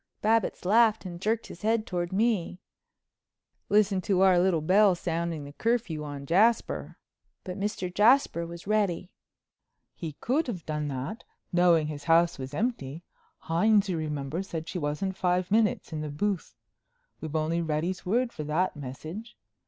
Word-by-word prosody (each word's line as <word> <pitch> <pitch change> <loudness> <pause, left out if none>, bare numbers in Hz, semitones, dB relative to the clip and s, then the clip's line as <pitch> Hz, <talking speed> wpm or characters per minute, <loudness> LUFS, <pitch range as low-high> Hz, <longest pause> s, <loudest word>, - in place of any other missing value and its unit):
Babbitts 220 -3 +1
laughed 220 +1 +4
and 175 -1 -7
jerked 225 +3 0
his 170 - -11
head 220 0 +1
toward 175 -1 -3
me. 195 -3 0 1.1
"Listen 205 -2 +3
to 190 0 +1
our 190 -2 +6
little 180 -2 +3
belle 190 +4 +4
sounding 170 -2 -3
the 140 0 -10
curfew 220 -8 -1
on 145 -2 -6
Jasper." 210 +10 +2 0.5
But 185 +1 -6
Mr. 195 -3 -3
Jasper 210 -5 +4
was 170 0 -9
ready. 195 -4 0 0.8
"He 160 -3 -6
could 270 - -1
have 185 -9 -5
done 150 -1 -2
that, 140 - -5 0.3
knowing 175 -3 +4
his 145 -1 -6
house 170 0 +3
was 130 +2 -6
empty. 165 - -2 0.4
Hines, 200 +5 +3
you 175 - 0
remember, 150 +1 -3
said 165 -4 -6
she 180 - -4
wasn't 155 +6 -2
five 180 0 0
minutes 215 -5 +1
in 155 - -3
the 155 - -4
booth. 175 - -2 0.7
We've 160 0 -5
only 160 +2 0
Reddy's 165 +3 -2
word 235 +6 0
for 155 - -5
that 165 +5 0
message. 155 - -8
180 Hz, 155 wpm, -28 LUFS, 155-210 Hz, 1.1 s, our